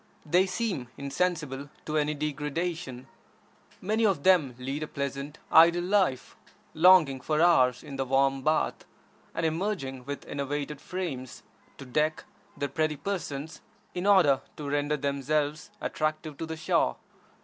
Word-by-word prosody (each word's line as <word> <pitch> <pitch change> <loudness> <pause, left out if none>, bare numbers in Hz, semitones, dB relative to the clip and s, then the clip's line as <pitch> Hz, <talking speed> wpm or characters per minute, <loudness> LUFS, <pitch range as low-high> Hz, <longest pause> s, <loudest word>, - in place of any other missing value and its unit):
They 180 +5 +3
seem 180 - -2
insensible 140 -1 -2 0.2
to 155 - -3
any 150 0 +1
degradation. 150 -1 -3 0.8
Many 215 +4 0
of 190 -9 +2
them 160 -10 +4
lead 135 +4 -4
a 155 - -3
pleasant, 140 +1 -4
idle 170 +2 +7
life, 185 -8 +1 0.4
lounging 160 -6 +6
for 155 +2 0
hours 130 -8 +4
in 140 - -8
the 135 - -1
warm 135 +1 +2
bath, 155 +3 0 0.5
and 165 - 0
emerging 160 -7 -2
with 145 0 -6
enervated 145 +1 -4
frames 150 -10 -5 0.3
to 135 - -9
deck 150 +4 0 0.3
their 140 - -2
pretty 155 +2 0
persons 155 -3 -4 0.3
in 180 +2 -2
order 155 -10 +5 0.2
to 150 - -5
render 145 +1 0
themselves 145 +4 -1
attractive 155 0 -2
to 165 - -4
the 160 0 -5
Shah. 155 - +1
150 Hz, 140 wpm, -28 LUFS, 140-170 Hz, 0.8 s, idle